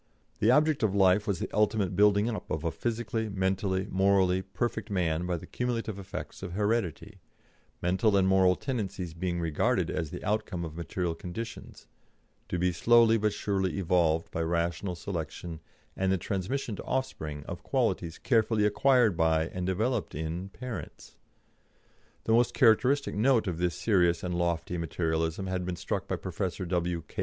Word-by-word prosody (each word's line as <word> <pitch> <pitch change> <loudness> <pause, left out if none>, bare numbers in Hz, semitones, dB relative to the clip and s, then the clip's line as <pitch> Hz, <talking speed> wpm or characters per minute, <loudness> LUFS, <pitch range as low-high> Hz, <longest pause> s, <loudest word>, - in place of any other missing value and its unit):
The 110 - +3
object 150 +3 +4
of 100 -3 +1
life 100 +2 +4
was 100 -3 0
the - - -4
ultimate 105 -3 +1
building 105 +2 +4
up 115 -3 -4
of 80 0 -2
a 85 - 0
physically, 115 0 -2
mentally, 95 0 0
morally 95 -1 +3
perfect 110 +2 -3
man 90 -3 0
by 90 -1 0
the - - -10
cumulative 115 -4 -3
effects 95 0 -7
of 85 - -6
heredity 100 -2 -1 0.6
mental 95 +4 +3
and 95 -1 +3
moral 95 -1 +4
tendencies 95 - -4
being 85 +1 -2
regarded 80 -3 +1
as 80 -4 -2
the - - -7
outcome 105 -5 -1
of 80 -1 -8
material 85 +1 -2
conditions, 110 +7 -8 0.6
to 90 - -1
be 90 +1 +2
slowly 115 +5 +5
but 105 0 +1
surely 100 -2 -1
evolved 85 -3 +1
by 85 - -2
rational 85 +3 -1
selection 85 -2 -5 0.4
and 95 0 +1
the 95 - +2
transmission 105 +7 -3
to - - -6
offspring 80 - -3
of - - -7
qualities 85 -1 -1
carefully 110 -3 +2
acquired 120 -1 +4
by, 80 0 +2
and 90 -1 -4
developed 110 - -1
in, 80 +5 -4
parents. 125 +3 -8 1.1
The 110 - +1
most 120 +1 +3
characteristic 130 +3 +4
note 115 +2 +3
of 85 -4 -3
this 90 -1 0
serious 90 -2 +2
and 90 -1 -2
lofty 85 0 -1
Materialism 80 +2 -1
had 95 -1 -2
been 90 0 -3
struck - - -3
by - - -1
Professor 95 +1 -4
W. 85 -1 -1
K. - - -21
95 Hz, 165 wpm, -29 LUFS, 85-110 Hz, 1.1 s, slowly